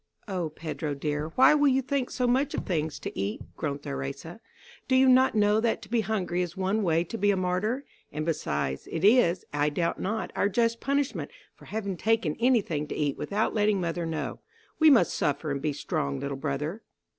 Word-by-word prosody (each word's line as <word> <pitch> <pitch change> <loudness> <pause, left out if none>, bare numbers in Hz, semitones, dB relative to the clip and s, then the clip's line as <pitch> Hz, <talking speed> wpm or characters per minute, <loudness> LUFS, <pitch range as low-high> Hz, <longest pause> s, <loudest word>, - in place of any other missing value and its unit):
'" - - -39
"O 180 -5 -2
Pedro, 150 -2 -4
dear, 150 +1 -2
why 260 - +7
will 295 -1 +4
you 265 0 +3
think 265 -1 -1
so 250 - -1
much 265 +4 +1
of - - -3
things 160 -4 -1
to - - -7
eat," 100 +2 -2 0.2
groaned 145 -2 -3
Theresa. 70 0 -5 0.5
"Do 260 - +2
you 260 +1 +5
not 260 -1 +5
know 210 0 +4
that 225 0 0
to 205 - -12
be 235 0 +2
hungry 190 -5 -1
is 175 0 -4
one 190 +3 0
way 165 -3 +2
to 225 +6 -6
be 205 +1 +3
a 200 - +3
martyr. 190 +9 -1 0.3
And 155 +1 -3
besides, 70 - -2
it 165 +3 -1
is, 200 -6 +4
I 145 0 +2
doubt 170 +3 -1
not, 215 +3 -2
our 200 - +2
just 230 +3 +1
punishment 280 0 -1 0.2
for - - -17
having 200 -3 -4
taken 220 -8 +1
any 245 -1 +4
thing 150 -5 -3
to - - -5
eat 145 -2 0
without 210 +2 -1
letting 210 -2 +2
mother 170 -1 -2
know. 160 -1 -4 0.4
We 315 -1 +7
must 235 - +5
suffer 145 +1 -1
and 140 0 -2
be 150 - 0
strong, 140 -2 -2
little 140 0 -3
brother." 150 +8 -3
185 Hz, 210 wpm, -27 LUFS, 150-225 Hz, 0.5 s, why